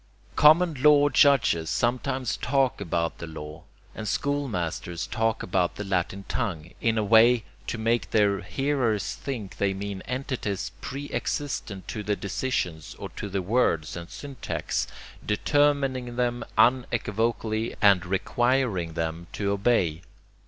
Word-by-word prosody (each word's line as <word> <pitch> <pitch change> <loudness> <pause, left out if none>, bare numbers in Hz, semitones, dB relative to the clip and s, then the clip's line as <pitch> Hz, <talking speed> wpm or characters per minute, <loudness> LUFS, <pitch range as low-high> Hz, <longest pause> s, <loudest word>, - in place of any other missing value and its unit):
Common 160 +3 +6
law 145 0 +6
judges 125 - +4
sometimes 125 +1 0
talk 135 -3 +1
about 85 -3 -1
the 85 - -6
law, 75 -1 -9 0.3
and 110 - -6
school 140 +6 0
masters 85 -4 -3
talk 115 -1 -1
about 90 -1 0
the 105 - -5
latin 95 0 -2
tongue, 90 -9 -3
in 115 -1 +2
a 110 - +2
way 115 +2 +5 0.2
to - - -2
make 115 -4 0
their 100 -3 +2
hearers 115 -1 0
think 115 -9 -6
they 100 -1 +1
mean 100 -1 -5
entities 125 -7 -3
pre 140 +2 -5
existent 110 -9 -3
to 105 - -4
the 105 0 0
decisions 90 - -3
or - - -6
to 100 - -6
the 95 -1 -2
words 90 -7 +1
and 85 0 -7
syntax, 140 -3 -4 0.4
determining 135 +1 +1
them 120 -1 0
unequivocally 115 -2 +1
and 100 -3 +5
requiring 100 -1 0
them 80 +1 -3
to 100 -1 -1
obey. 100 -6 +1
110 Hz, 135 wpm, -26 LUFS, 95-125 Hz, 0.4 s, Common